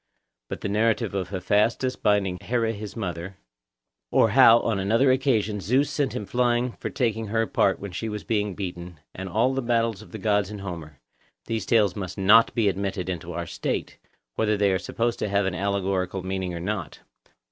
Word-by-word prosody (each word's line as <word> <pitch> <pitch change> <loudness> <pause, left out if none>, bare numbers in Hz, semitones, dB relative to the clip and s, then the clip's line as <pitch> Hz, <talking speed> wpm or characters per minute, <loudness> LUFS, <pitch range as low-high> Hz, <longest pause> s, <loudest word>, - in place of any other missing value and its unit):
But - - -5
the - - -2
narrative 110 +1 +1
of 95 -2 -2
Hephaestus 105 +7 +1
binding 95 -3 +1
Here 120 -1 0
his 110 -2 -4
mother, 90 -3 -5 0.7
or - - +4
how 115 +1 +7
on 110 -4 -1
another 115 +7 +3
occasion 110 -6 +1
Zeus 130 - +1
sent 140 -3 -1
him 105 - -3
flying 120 +1 +1
for - - -6
taking 115 -4 -1
her 115 +2 +1
part 100 - +1
when 100 -1 -7
she 110 +6 -4
was 105 -1 -5
being 105 -4 -1
beaten, 90 -4 -6
and 95 0 -6
all 115 +7 +2
the 135 - -1
battles 115 -4 0
of 110 - -15
the 110 - -6
gods 105 -1 +1
in 105 - -6
Homer—these 90 - -8
tales 105 -6 +3
must 95 -1 -5
not 105 +4 +6
be 115 -4 +2
admitted 95 -1 -2
into 85 -1 -5
our 85 +1 -3
State, - - -4 0.3
whether 105 -1 +1
they 100 -1 +3
are 95 - +1
supposed 115 +3 -2
to 105 - -1
have 100 0 +1
an 95 - -1
allegorical 95 -1 -1
meaning 95 -1 -3
or - - -4
not. 90 -3 -4
105 Hz, 190 wpm, -25 LUFS, 95-115 Hz, 0.7 s, how